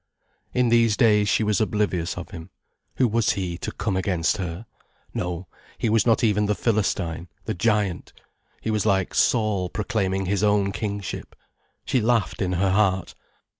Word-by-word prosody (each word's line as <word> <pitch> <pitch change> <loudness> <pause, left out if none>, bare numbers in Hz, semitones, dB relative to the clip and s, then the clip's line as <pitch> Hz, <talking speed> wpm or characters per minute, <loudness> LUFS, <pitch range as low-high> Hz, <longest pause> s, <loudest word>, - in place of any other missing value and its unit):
In 125 -1 +2
these 115 -2 +4
days 105 -3 +4
she 110 - +2
was 105 -2 +1
oblivious 105 -6 0
of - - -7
him. 80 +2 -9 0.5
Who 130 - +3
was 115 -1 +2
he, 90 -3 -3
to - - -4
come 100 -4 -2
against 90 -1 0
her? 90 +2 -5 0.5
No, 90 0 -3 0.3
he 115 - 0
was 110 +1 +3
not 115 +2 +3
even 105 -2 +2
the 105 - +1
Philistine, 95 -7 -1 0.2
the 110 - -2
Giant. 105 -2 0 0.5
He 110 - -2
was 105 -1 +1
like 95 -3 +1
Saul 105 -6 +2
proclaiming 95 -2 -1
his 100 +1 0
own 105 -2 +2
kingship. 100 -3 -5 0.5
She 130 -3 +1
laughed 115 -1 +1
in 90 -1 0
her 95 +2 +1
heart. 95 -3 +1
100 Hz, 165 wpm, -24 LUFS, 95-110 Hz, 0.5 s, these